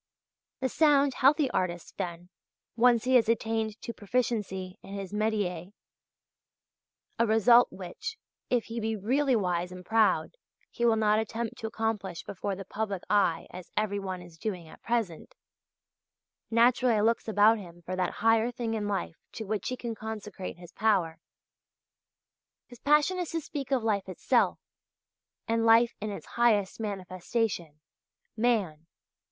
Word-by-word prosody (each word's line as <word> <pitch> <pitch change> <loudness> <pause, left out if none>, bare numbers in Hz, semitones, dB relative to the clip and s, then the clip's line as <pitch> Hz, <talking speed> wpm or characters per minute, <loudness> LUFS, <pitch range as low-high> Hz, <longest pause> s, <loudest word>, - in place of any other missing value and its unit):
The 260 - +2
sound, 285 -1 +4
healthy 280 +3 +4
artist, 175 -4 -2
then, 175 0 -5 0.5
once 235 -1 +4
he 260 +1 +1
has 230 -2 +2
attained 225 -1 0
to 235 - -5
proficiency 205 -5 -2
in 195 - -9
his 195 -1 -6
métier 205 -4 -1 1.5
a 230 - +3
result 235 +3 +5
which, 195 - -7 0.3
if 245 -2 +1
he 230 +1 -5
be 220 0 -1
really 260 +6 +1
wise 180 -4 0
and 180 0 -10
proud, 225 - +2 0.3
he 235 - -1
will 230 -1 +5
not 215 -1 +3
attempt 225 +1 -3
to 225 - -3
accomplish 220 -5 -3
before 200 +1 -4
the 195 +1 -8
public 200 -2 -3
eye 200 -5 +2
as 180 -1 -10
every 205 -1 0
one 185 -2 -5
is 170 -2 -15
doing 180 -6 -4
at - - -15
present 230 - -2 1.1
naturally 235 0 +4
looks 230 +2 +1
about 220 +1 +5
him 175 -3 -12
for 185 +3 -4
that 185 -1 -1
higher 225 +1 +4
thing 235 -2 -3
in 210 -2 -2
life 85 - -3 0.2
to 220 - -5
which 205 -1 -2
he 255 - -3
can 235 -1 -4
consecrate 210 -4 -6
his 175 0 -13
power. 190 -7 +1 1.5
His 245 - -15
passion 300 +7 +3
is 355 - -2
to 330 - 0
speak 285 -3 -6
of 260 -4 +2
life 205 -4 0
itself, 185 - +1 0.9
and 230 0 +1
life 230 +1 +5
in 215 - -3
its 200 - -7
highest 220 -5 +1
manifestation 185 -4 -3 0.5
Man. 205 -9 0
220 Hz, 150 wpm, -29 LUFS, 185-235 Hz, 1.5 s, result